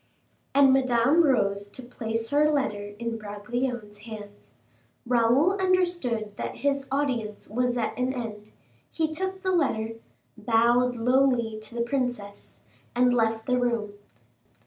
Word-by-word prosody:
And 275 -1 +6
Madame 260 +4 +4
rose 200 -8 +1
to 255 - -8
place 230 -1 -4
her 300 +1 +4
letter 205 -9 -1
in 230 0 -4
Bragelonne's 210 +1 -4
hands. 210 -2 -11 0.6
Raoul 245 +7 +3
understood 345 - 0
that - - -4
his 275 -1 +1
audience 250 -7 -2
was 245 +3 0
at 230 - -1
an 255 +1 +1
end; 215 -4 -6 0.4
he 315 -1 -1
took 380 +3 -4
the 375 - +1
letter, 225 -10 0 0.4
bowed 235 +3 +2
lowly 240 -2 +2
to 215 +2 -11
the 235 - -1
princess, 240 -5 -4 0.3
and 245 0 +4
left 225 -2 +1
the 250 -1 +1
room. 235 -4 -1
240 Hz, 130 wpm, -26 LUFS, 220-270 Hz, 0.6 s, And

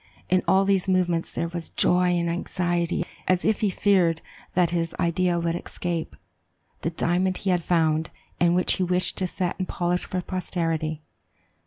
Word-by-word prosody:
In 185 0 +4
all 195 +1 +4
these 195 -1 +2
movements 175 -3 +1
there 170 - -3
was 170 -1 -5
joy 180 0 +3
and 170 0 0
anxiety, 175 0 -1 0.2
as 185 -1 +2
if 220 -1 +2
he 210 - +2
feared 180 -4 +2 0.3
that 175 -2 +3
his 165 -1 -1
idea 175 +1 +1
would 170 0 0
escape, 175 -1 -4 0.7
the - - 0
diamond 180 +3 +1
he 195 - -1
had 175 -2 +1
found, 160 -2 +1 0.3
and 175 0 +4
which 180 - +2
he 185 - +1
wished 180 +1 0
to 185 - 0
set 180 +1 -3
and 185 - -2
polish 175 0 -1
for 185 - -2
posterity. 165 -4 -2
175 Hz, 170 wpm, -25 LUFS, 170-185 Hz, 0.7 s, In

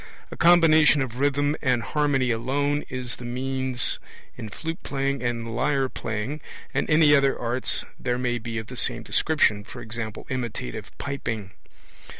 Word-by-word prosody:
A - - -6
combination 160 -4 +6
of 125 -1 -6
rhythm 145 +1 +2
and 125 -4 +2
harmony 140 -3 +1
alone 140 +5 0
is 130 -2 -4
the - - -10
means 130 0 -1 0.4
in 110 -3 -7
flute 165 - -5
playing 140 0 -1
and 115 -2 -2
lyre 135 0 +1
playing, 115 +8 -4 0.3
and - - 0
any 155 -1 +6
other 140 -1 +3
arts 120 +2 -1
there 125 -1 -1
may 120 -1 -1
be 115 0 -5
of 110 - -3
the 125 - -9
same 120 -2 -1
description, 150 -6 +2
e.g. 110 +3 -7 0.3
imitative 120 - -4
piping. 115 -8 -4
130 Hz, 150 wpm, -25 LUFS, 120-145 Hz, 0.4 s, combination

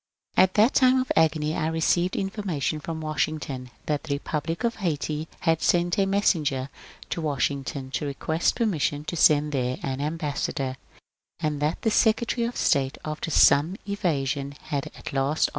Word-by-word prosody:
At 185 0 +4
that 220 +5 +5
time 260 0 +5
of 255 - -2
agony 155 -1 +2
I 155 - 0
received 165 +3 +1
information 195 -7 -2
from 160 +1 -5
Washing 155 0 -1
ton 130 -4 -6 0.2
that 150 -1 -1
the 140 -3 -1
Republic 155 +6 -3
of 235 -1 0
Haiti 155 -4 -2
had 165 -2 +2
sent 175 +2 +2
a 195 - +3
messenger 150 -9 +1 0.4
to 170 - -2
Wash 145 -4 +1
ington 135 -1 -6
to 150 - -1
request 160 +4 0
permission 155 -9 0
to 155 - -4
send 150 -2 +4
there 130 -2 -1
an 135 0 -2
ambassador, 145 -4 -2 0.6
and 150 -2 -1
that 150 +3 -1
the 225 - +2
Secretary 230 +2 +2
of 240 - -6
State, 135 -1 +1
after 155 +2 -4
some 155 +3 +5
evasion, 140 -8 -1
had 145 -3 -3
at - - -8
last 140 +3 +1
155 Hz, 165 wpm, -25 LUFS, 140-175 Hz, 0.6 s, that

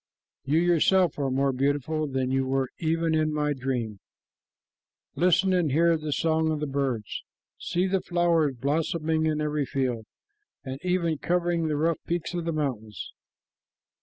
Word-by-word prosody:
You 145 +3 +2
yourself 175 0 +3
are 140 -1 0
more 135 +1 +1
beautiful 145 +3 0
than 130 -2 -1
you 135 0 +2
were 135 -1 0
even 165 0 0
in 155 0 +2
my 150 -1 0
dream. 125 -6 -3 1.1
Listen 180 +2 +3
and 175 -5 +2
hear 165 +4 +4
the 155 -1 -4
song 160 +1 +1
of 155 - -1
the 150 - -1
birds. 135 -7 -2 0.4
See 180 +2 0
the 190 0 +1
flowers 170 -5 +1
blossoming 155 +4 0
in 155 -1 0
every 150 -2 -1
field, 125 -5 -2 0.6
and 130 0 -6
even 175 -4 0
covering 175 -2 0
the 150 -1 0
rough 165 +2 +1
peaks 175 0 -2
of 175 -1 -3
the 165 - 0
mountains. 120 - -4
155 Hz, 155 wpm, -26 LUFS, 135-170 Hz, 1.1 s, hear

